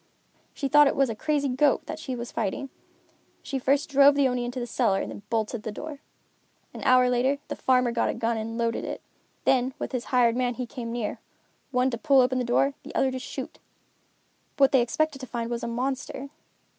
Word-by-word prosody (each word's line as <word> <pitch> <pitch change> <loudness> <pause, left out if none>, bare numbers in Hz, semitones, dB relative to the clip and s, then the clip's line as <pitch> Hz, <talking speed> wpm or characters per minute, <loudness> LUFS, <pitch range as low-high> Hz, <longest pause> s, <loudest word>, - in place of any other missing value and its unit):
She 275 - -2
thought 295 +1 +6
it - - +1
was 270 -3 +2
a - - -5
crazy 290 +3 0
goat 270 +2 +2
that 315 - -6
she 260 -5 -4
was 235 0 -6
fighting. 230 +6 -3 0.7
She 270 - -3
first 275 +3 +1
drove 280 0 +6
the 280 -1 +4
Oni 250 -1 -1
into 245 +1 -4
the 240 - -3
cellar 225 -5 +1
and - - -4
then - - -9
bolted 225 0 -1
the 215 - -5
door. 300 +6 -7 0.7
An - - -8
hour 255 0 +5
later, 250 +3 +2
the - - -3
farmer 250 -2 +2
got 235 - 0
a - - -2
gun 230 0 0
and 225 +1 -4
loaded 230 -1 -1
it. - - -6 0.4
Then, 260 0 +2
with - - -5
his 250 -3 -3
hired 240 -2 +3
man 245 -1 0
he 250 - -3
came 235 -1 -6
near, 235 -3 -3 0.5
one 255 -1 +1
to 235 - -4
pull 280 -2 +4
open 255 +1 +1
the - - 0
door, 240 +3 +3 0.2
and - - -9
the - - -17
other 265 - +2
to 260 - -4
shoot. - - -7 1.0
What 275 -2 +5
they 265 - +5
expected 290 +4 0
to 260 - -7
find 235 -1 -4
was 235 0 -2
a - - -3
monster. 265 +3 -3
250 Hz, 220 wpm, -26 LUFS, 235-275 Hz, 1.0 s, thought